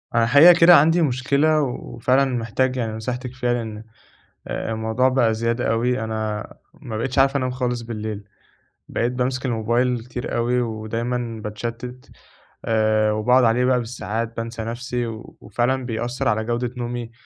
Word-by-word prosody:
أنا 115 - +4
الحقيقة 145 +9 +8
كده 170 +1 +9
عندي 165 +4 +5
مشكلة 140 +2 +2
وفعلًا 130 0 0
محتاج 125 +1 -1
يعني 115 -3 -2
نصيحتِك 125 +3 -5
فيها 125 -1 -1
لأن 110 -3 -4 0.7
الموضوع 110 +3 0
بقى 125 -4 +2
زيادة 115 +2 -1
أوي، 125 +3 +1
أنا 110 -1 -3 0.3
ما 110 -3 -7
بقيتش 130 +4 -2
عارف 135 +1 +4
أنام 130 -2 -1
خالص 125 -2 -2
بالليل، 110 -3 -5 0.7
بقيت 120 +2 0
بامسك 130 +1 -2
الموبايل 120 +1 0
كتير 125 0 -5
أوي 120 +1 +1
ودايمًا 115 +1 -3
باتشتّت 120 +4 -6 0.6
آآ، 110 -1 +2
وباقعد 125 +4 +3
عليه 120 +2 +3
بقى 125 -1 +3
بالساعات 115 -1 -4
بانسى 115 0 -4
نفسي، 120 +1 -3 0.4
وفعلًا 125 +5 -1
بيأثّر 120 +3 -3
على 110 +1 +1
جودة 120 +1 -2
نومي، 120 -1 -4
120 Hz, 145 wpm, -22 LUFS, 115-125 Hz, 0.7 s, كده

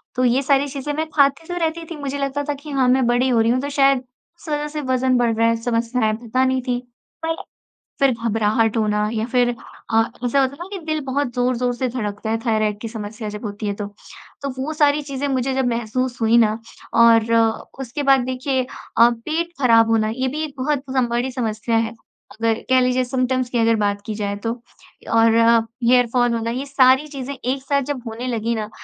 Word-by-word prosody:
तो 255 - +1
ये 250 +2 +3
सारी 280 +1 +2
चीज़ें 280 +1 -4
मैं 315 +1 -2
खाती 280 +3 +3
तो 355 0 -4
रहती 330 0 -1
थी 330 - -4
मुझे 280 0 -3
लगता 280 +1 -2
था - - +2
कि 285 +2 -11
हाँ 265 -2 +2
मैं 260 -1 +3
बड़ी 245 +2 +2
हो 235 -2 +3
रही 230 +1 +3
हूँ 255 - +2
तो 285 - -3
शायद 275 -2 +3 0.3
उस - - -17
वज़ह 295 0 -1
से 300 0 -5
वज़न 255 -1 +1
बढ़ 235 -2 +2
रहा 230 +1 +3
है। 230 - +3
समस्या 235 +1 -1
है, 215 - +2
पता 245 +3 0
नहीं 260 0 +1
थी। 245 -1 0 0.5
पर 325 0 0 0.6
फिर 275 -1 +4
घबराहट 225 +1 +1
होना 210 -1 +1
या 220 -1 -1
फिर 245 -1 +3 0.4
अ, 225 - +6 0.2
ऐसा 275 +3 +3
होता 265 +1 0
है - - -12
ना 350 - -6
कि 395 - -4
दिल 310 -1 -1
बहुत 265 -2 -1
ज़ोर-ज़ोर 245 0 +1
से 255 +1 -1
धड़कता 220 -3 -4
है 225 - +1
थाइरॉइड 215 -2 +1
की 230 - -4
समस्या 215 0 -6
जब 210 +2 -7
होती 205 +1 -5
है 200 - 0
तो। 205 0 -4 0.6
तो 280 - -3
वो 310 +3 -3
सारी 295 -1 +3
चीज़ें 280 0 -4
मुझे 265 -1 0
जब 265 -1 0
महसूस 240 +2 -2
हुई 225 +1 +4
ना 220 -1 +3 0.4
और 230 0 +5 0.5
उसके 270 +3 -4
बाद 275 -1 +5
देखिए 260 +1 -1 0.3
अ, 235 +1 +7
पेट 315 +9 -3
ख़राब 230 -2 +5
होना 220 -1 +2
ये 260 0 -1
भी 305 +4 -3
एक 300 - -5
बहुत 275 +1 -1 0.3
बड़ी 240 +2 -1
समस्या 225 -1 -1
है 225 0 0 0.4
अगर 225 0 0 0.2
कह 260 0 +5
लीजिए 255 0 +2
सिम्प्टम्स 255 0 -1
की 245 - -2
अगर 230 0 +3
बात 205 -1 0
की 220 - -3
जाए 205 -1 -2
तो। 230 - 0 0.6
और 225 0 +5 0.5
हेयरफॉल 245 0 +3
होना 230 0 -2
ये 260 +3 -3
सारी 270 +1 +4
चीज़ें 280 -1 -6
एक 265 +1 -3
साथ 280 +1 +1
जब 260 -4 -4
होने 235 +3 -5
लगी 230 -1 -1
ना 215 -1 -4
250 Hz, 215 wpm, -21 LUFS, 230-275 Hz, 0.6 s, अ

